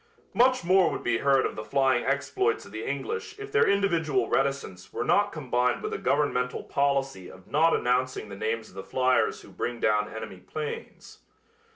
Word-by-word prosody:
Much 255 -3 +3
more 185 0 +4
would - - -5
be 115 -1 +1
heard 135 -1 +3
of - - -3
the 110 - -5
flying 130 +2 +2
exploits 140 -4 0
of - - -13
the 110 +1 -5
English 425 - -4
if 415 0 -8
their 430 - +4
individual 165 - +1
reticence 135 -9 -1
were - - -2
not 205 0 +3
combined 125 -6 0
with - - -3
a - - -3
governmental 130 -2 0
policy 135 -8 -1
of 95 0 -14
not 160 +3 +3
announcing 125 -2 0
the 100 - -8
names 110 +2 -2
of - - -19
the 95 - -6
fliers 130 0 +1
who - - -15
bring 120 -1 -4
down 105 -1 +1
enemy 110 -4 -7
planes. 150 +10 -7
135 Hz, 185 wpm, -27 LUFS, 115-155 Hz, -, more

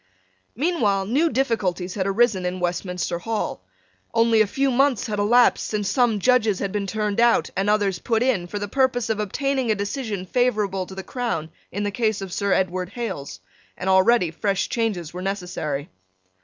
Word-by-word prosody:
Meanwhile 230 - +1
new 285 +11 +2
difficulties 195 - -1
had 190 -2 -1
arisen 200 -1 +2
in 180 +1 -2
Westminster 180 -1 -2
Hall. 220 - -3 0.5
Only 230 -1 +4
a 215 - +3
few 270 +6 0
months 265 -2 +2
had 210 -2 -3
elapsed 240 +4 +4
since 205 -2 -1
some 240 -2 +2
Judges 220 -1 +3
had 195 0 -3
been 205 -1 -2
turned 210 +1 -1
out 235 0 +3
and 195 +2 0
others 200 -4 +1
put 225 +3 0
in 215 -9 +1
for 205 - -5
the 205 0 -3
purpose 245 -1 +1
of 215 - -2
obtaining 265 +4 -1
a 215 - +3
decision 205 -1 -3
favourable 205 -4 0
to 190 - -10
the 190 - -6
crown 185 -9 -3 0.2
in 205 - -3
the 205 - -1
case 220 -1 0
of 195 -3 -6
Sir 200 -1 -1
Edward 185 -1 0
Hales; 145 - -5 0.4
and 185 - -5
already 190 -1 +4
fresh 195 +3 -1
changes 200 -9 -2
were 180 - -5
necessary. 180 -7 -3
205 Hz, 180 wpm, -23 LUFS, 185-235 Hz, 0.5 s, Only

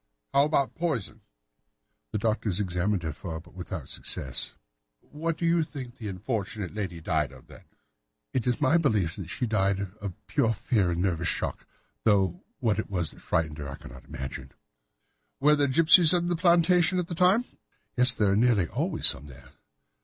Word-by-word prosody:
"How 140 +1 +5
about 145 -3 +1
poison?" 115 - -3 0.9
"The - - -1
doctors 105 -3 -1
examined 95 0 -1
her 80 -2 -3
for 80 +1 -6
it, 80 - -10
but 85 - -19
without 90 -1 -7
success." 65 -2 -3 0.5
"What 160 +2 -4
do 170 - -2
you 170 0 +3
think 140 -5 -6
that 125 - -30
this 110 -3 -5
unfortunate 100 0 -4
lady 95 -5 -4
died 80 -3 0
of, 65 -2 -15
then?" - - -16 0.7
"It 125 -2 -1
is 125 - +1
my 150 +3 +4
belief 105 - +1
that - - -6
she 125 - -2
died 100 -3 0
of 100 -4 -5
pure 115 - +1
fear 105 -3 0
and 85 +1 -1
nervous 85 -3 0
shock, - - -2 0.4
though 95 -5 +2
what 110 -5 0
it - - -4
was 90 -5 -2
that - - -15
frightened 80 -2 -1
her 70 -2 -5
I 70 - -6
cannot - - -13
imagine." 65 -1 -7 0.9
"Were 150 +2 +5
there 145 -1 +2
gipsies 165 +4 +6
in 175 0 0
the 175 - +1
plantation 175 +1 +3
at 180 - 0
the 170 - -6
time?" 185 +7 +3 0.5
"Yes, 125 -1 +4
there 105 -2 +2
are - - +2
nearly 110 -5 +3
always - - -1
some 70 - +6
there." 65 -2 -14
105 Hz, 185 wpm, -27 LUFS, 85-145 Hz, 0.9 s, gipsies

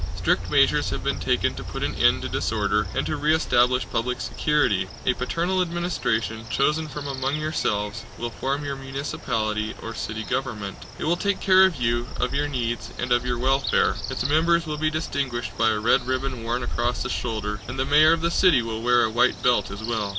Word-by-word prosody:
Strict - - 0
measures - - +3
have - - -4
been - - -1
taken - - +1
to - - -7
put - - -5
an - - -1
end - - +3
to - - -2
disorder 105 -2 0
and - - 0
to 155 - -1
re 150 +1 +2
establish 125 -4 +2
public 125 +2 -1
security. 145 -11 +1 0.2
A 125 - +3
paternal 170 +9 -1
administration, 165 -11 -2
chosen 150 +3 +1
from 145 0 -7
among 135 0 -2
yourselves, 110 -9 -2
will 120 0 -4
form 140 +4 -2
your 140 -1 -3
municipality 115 -5 -3
or 115 - -6
city 110 0 -4
government. 110 -6 -3 0.2
It - - -5
will 170 +3 +1
take 200 0 0
care 190 0 +6
of 190 - -4
you, 120 -1 0
of 125 - 0
your 145 +1 0
needs, 120 -4 -3
and 125 0 -3
of 120 +1 +2
your 120 -1 0
welfare. 135 +2 +2 0.2
Its 135 - -2
members 170 +3 +3
will 155 -1 -4
be 155 0 +2
distinguished 130 -8 -3
by 115 +2 +3
a 110 - +1
red 120 +3 +2
ribbon 130 -1 -2
worn 120 +2 -2
across 120 0 -1
the - - -3
shoulder, 105 -3 -3
and 120 +3 -6
the 130 - 0
mayor 150 +3 +6
of 165 - -1
the 170 +1 +1
city 170 -10 +4
will 110 -1 -4
wear 120 +1 +4
a 110 - 0
white 120 +2 +2
belt 120 -6 +3
as 100 +2 -7
well. 110 -3 -1
125 Hz, 210 wpm, -24 LUFS, 115-150 Hz, 0.2 s, care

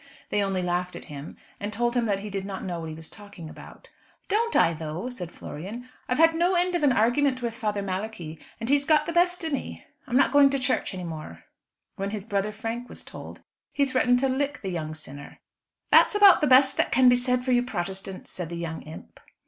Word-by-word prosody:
They 205 - +2
only 195 -2 -1
laughed 180 0 -1
at - - -8
him, 140 +1 -8 0.2
and 205 +1 -4
told 240 +3 0
him 240 -2 +1
that 200 -2 0
he 210 0 -7
did 195 -1 -3
not 195 -1 -6
know 175 -2 -4
what 160 -1 -6
he 155 - -6
was 160 0 -9
talking 200 -6 -10
about. - - -14 0.4
"Don't 460 +3 +1
I 165 - +5
though?" 160 +8 -5
said 180 -9 -6
Florian. 210 +11 -8 0.2
"I've 250 - +1
had 325 +1 +6
no 350 +3 +2
end 360 +1 +2
of 345 - 0
an 290 -2 +4
argument 255 +3 +2
with 235 -1 -1
Father 210 -4 -2
Malachi, 185 -4 -5 0.2
and 225 - -4
he's 285 +2 +3
got 305 +1 +3
the 335 - -3
best 355 0 +2
o' - - -1
me. 280 - -5 0.2
I'm 250 -1 +1
not 275 - +4
going 285 0 +6
to 275 - 0
church 255 -6 -1
any 180 - -5
more." 155 - -8 0.5
When 195 +1 -2
his 205 -1 -5
brother 205 -1 -1
Frank 225 +3 -5
was - - -8
told, - - -10 0.3
he 280 - +2
threatened 255 -2 +3
to 270 - +3
"lick 280 +1 -2
the 190 - -2
young 155 -3 -4
sinner." 145 -2 -9 0.5
"That's - - +6
about 405 -2 +7
the 300 - +3
best 260 0 +5
can 255 0 +5
be 245 - +7
said 250 0 0
for 260 - +1
you 245 -1 +4
Protestants," 195 -4 -5
said 175 -3 -6
the 170 - -5
young 165 -1 -5
imp. 155 +1 -12
225 Hz, 230 wpm, -26 LUFS, 180-265 Hz, 0.5 s, about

